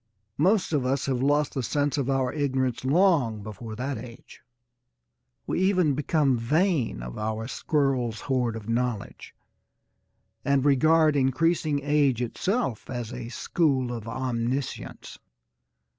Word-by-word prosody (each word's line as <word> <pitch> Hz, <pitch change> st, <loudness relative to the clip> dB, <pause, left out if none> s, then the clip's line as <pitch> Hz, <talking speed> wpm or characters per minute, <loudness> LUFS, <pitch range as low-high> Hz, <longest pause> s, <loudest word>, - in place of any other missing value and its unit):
Most 185 Hz, +2 st, +2 dB
of 145 Hz, -4 st, +2 dB
us 130 Hz, +1 st, 0 dB
have 130 Hz, -2 st, -1 dB
lost 145 Hz, +2 st, +2 dB
the 135 Hz, -, -1 dB
sense 145 Hz, +4 st, 0 dB
of 140 Hz, -3 st, -1 dB
our 135 Hz, -2 st, +1 dB
ignorance 130 Hz, -5 st, -1 dB
long 140 Hz, -, +2 dB
before 110 Hz, +1 st, -7 dB
that 130 Hz, +1 st, -3 dB
age. 120 Hz, +1 st, -12 dB, 1.0 s
We -, -, -1 dB
even 185 Hz, -5 st, +3 dB
become 140 Hz, -2 st, +1 dB
vain 150 Hz, -, +1 dB
of -, -, -7 dB
our 110 Hz, +1 st, -3 dB
squirrel's 130 Hz, -6 st, 0 dB
hoard 125 Hz, -4 st, 0 dB
of 110 Hz, -2 st, -8 dB
knowledge 115 Hz, -2 st, -3 dB, 1.1 s
and 140 Hz, -1 st, +2 dB
regard 155 Hz, +2 st, +4 dB
increasing 145 Hz, +2 st, +1 dB
age 145 Hz, -4 st, +2 dB
itself 130 Hz, -, -2 dB
as 120 Hz, -2 st, -5 dB
a 120 Hz, -2 st, -6 dB
school 130 Hz, -3 st, 0 dB
of 115 Hz, -2 st, -6 dB
omniscience. 125 Hz, +2 st, -3 dB
130 Hz, 130 wpm, -26 LUFS, 120-150 Hz, 1.1 s, regard